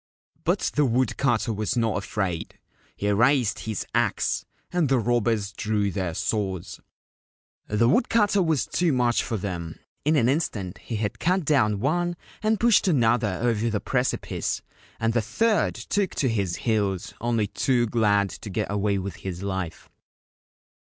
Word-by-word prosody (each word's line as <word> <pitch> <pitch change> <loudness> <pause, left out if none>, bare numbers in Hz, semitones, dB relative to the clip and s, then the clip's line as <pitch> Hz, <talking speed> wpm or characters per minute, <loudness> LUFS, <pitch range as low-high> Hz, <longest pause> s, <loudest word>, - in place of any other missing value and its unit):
But - - +1
the 150 - +3
wood 125 -2 +1
cutter 120 -4 +1
was 105 +3 -2
not 115 -2 +1
afraid. 95 -4 -3 0.4
He 100 - -3
raised 120 +1 +3
his 110 -3 -4
axe, - - +1 0.3
and 170 -6 +2
the 135 - +4
robbers 115 -3 +1
drew 105 -1 0
their 95 -4 -2
swords. 95 -2 -2 0.9
The 105 +3 +2
woodcutter 205 - +3
was 160 - +1
too 170 - +1
much 120 -2 +2
for 115 - -2
them. 85 -4 -5 0.3
In 155 +2 +3
an 120 -5 +3
instant 115 - -1
he 115 - -5
had 105 -1 -2
cut 180 0 +1
down 110 -9 +2
one 175 +6 0 0.3
and 215 0 +1
pushed 230 -3 +4
another 120 - +2
over 115 -1 +1
the 105 -2 -1
precipice, 125 +3 -1 0.4
and 115 0 +1
the 120 - +2
third 215 - +1
took 200 -3 -1
to 130 - +1
his 100 -6 0
heels, 100 -5 -1
only 115 -2 +1
too 120 +4 +1
glad 105 -4 +2
to 105 - -8
get 105 +1 -2
away 100 0 +1
with 95 -1 -5
his 95 -2 -6
life. 95 -4 -4
115 Hz, 155 wpm, -25 LUFS, 100-135 Hz, 0.9 s, the